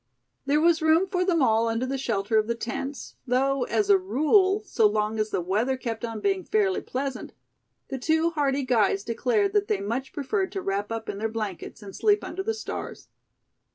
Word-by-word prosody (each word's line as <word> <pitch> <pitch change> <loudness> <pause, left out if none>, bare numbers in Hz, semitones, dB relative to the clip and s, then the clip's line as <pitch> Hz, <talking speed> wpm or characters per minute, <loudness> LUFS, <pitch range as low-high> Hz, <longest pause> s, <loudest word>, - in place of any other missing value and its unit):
There 290 +2 +3
was 330 +1 +3
room 320 +3 +4
for 365 -1 -1
them 340 -5 +2
all 225 -1 +3
under 230 +2 -1
the 270 +1 -2
shelter 220 -3 +1
of 215 - -1
the 235 - 0
tents, 265 +4 -5
though 265 +1 +1
as 415 - 0
a 400 -1 +6
rule, 380 +4 +3
so 225 - +3
long 215 +1 -1
as 215 0 0
the 180 - -1
weather 215 +9 0
kept 230 -3 -5
on 225 -2 -4
being 390 -2 0
fairly 410 -3 +1
pleasant, 265 0 -4 0.6
the 270 -2 -4
two 320 +5 +2
hardy 285 -3 0
guides 210 -5 +2
declared 265 - 0
that 415 -1 +2
they 195 - 0
much 235 +7 -3
preferred 375 +8 -2
to 390 - -3
wrap 200 +2 -2
up 225 -1 -4
in 200 - -4
their 225 +1 -1
blankets 215 -2 -5
and 195 -2 -9
sleep 420 -1 +2
under 380 - -4
the 445 +3 -2
stars. 440 - -7
265 Hz, 200 wpm, -26 LUFS, 220-360 Hz, 0.6 s, a